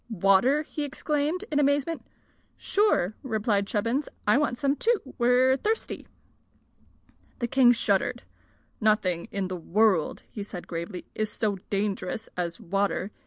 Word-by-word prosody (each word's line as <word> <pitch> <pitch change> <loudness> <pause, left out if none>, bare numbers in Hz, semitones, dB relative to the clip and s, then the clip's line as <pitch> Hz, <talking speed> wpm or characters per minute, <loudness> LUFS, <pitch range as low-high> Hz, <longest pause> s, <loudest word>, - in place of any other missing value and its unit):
"Water!" 220 - +3
he 300 0 -5
exclaimed, 295 +5 -1
in 295 - +2
amazement. 285 +3 +1 0.5
"Sure," 400 - +2
replied 215 -5 0
Chubbins. 230 +8 -1 0.2
"I 210 - +4
want 280 -3 +1
some, 280 +1 +1
too. 460 +6 +2 0.2
We're 250 +2 +4
thirsty." 440 +8 -2 1.3
The 240 - -1
king 250 0 +5
shuddered. 235 - 0 0.6
"Nothing 210 -6 +2
in 195 -2 -2
the 185 0 -4
world," 190 0 +1 0.2
said 200 -3 -7
he - - -19
gravely, 170 +2 -5
"is 215 -1 -2
so 210 -4 -1
dangerous 205 +2 -2
as 175 +1 -3
water. 200 0 -1
220 Hz, 130 wpm, -27 LUFS, 195-280 Hz, 1.3 s, king